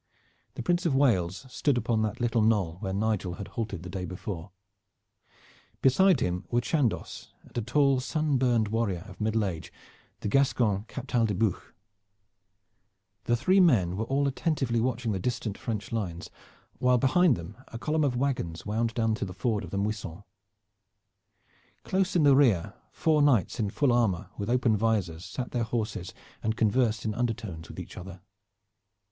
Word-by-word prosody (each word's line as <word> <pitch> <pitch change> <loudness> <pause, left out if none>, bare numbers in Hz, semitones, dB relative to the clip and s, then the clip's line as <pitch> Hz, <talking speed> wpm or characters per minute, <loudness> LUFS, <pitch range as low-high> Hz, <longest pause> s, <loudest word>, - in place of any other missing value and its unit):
The - - -5
Prince 175 0 +1
of 140 - +1
Wales 100 -6 +2
stood 130 +1 0
upon 115 -1 +1
that 110 -1 -2
little 120 -1 +1
knoll 100 -7 +2
where 95 -2 -3
Nigel 100 -3 -1
had 100 - -7
halted 105 -7 -4
the - - -7
day 95 0 -4
before. 90 0 -6 1.3
Beside 145 +3 +5
him 90 0 -1
were 120 - +2
Chandos, 120 0 -1
and - - -20
a 120 - 0
tall 135 +3 +3
sun 150 0 0
burned 120 -4 +2
warrior 105 -6 -1
of 95 0 -11
middle 110 0 +1
age, 85 -4 -5 0.5
the - - -2
Gascon 110 -5 +2
Captal 125 -3 -1
de 105 - -1
Buch. 105 -1 -1 1.5
The 120 - +2
three 185 +11 +3
men 110 - +4
were 110 +3 -2
all 140 +3 +1
attentively 135 -4 0
watching 120 -1 -1
the 95 - -1
distant 115 -1 -2
French 105 -3 -4
lines, 95 -7 -4 0.5
while 125 0 +4
behind 150 +4 +4
them 85 -2 -8
a 115 - -8
column 155 +5 0
of 130 -4 +1
wagons 120 - -2
wound 115 +2 -1
down 115 -1 +1
to 110 - -2
the 90 - -7
ford 105 +1 -1
of 90 - -7
the 100 - -4
Muisson. 100 -3 -3 1.6
Close 190 -1 0
in 170 - +4
the 140 -2 +6
rear 115 -12 +3 0.2
four 155 -2 +2
knights 130 -11 +3
in 105 -3 0
full 135 +4 +2
armor 105 -8 +1
with 100 +2 -4
open 120 -2 +3
visors 100 -6 0
sat 125 +5 -5
their 120 - -1
horses 110 -6 -3 0.3
and 110 0 -1
conversed 115 0 +1
in 110 - 0
undertones 110 -9 -3
with - - -8
each - - -8
other. 90 -1 -9
115 Hz, 170 wpm, -28 LUFS, 100-130 Hz, 1.6 s, the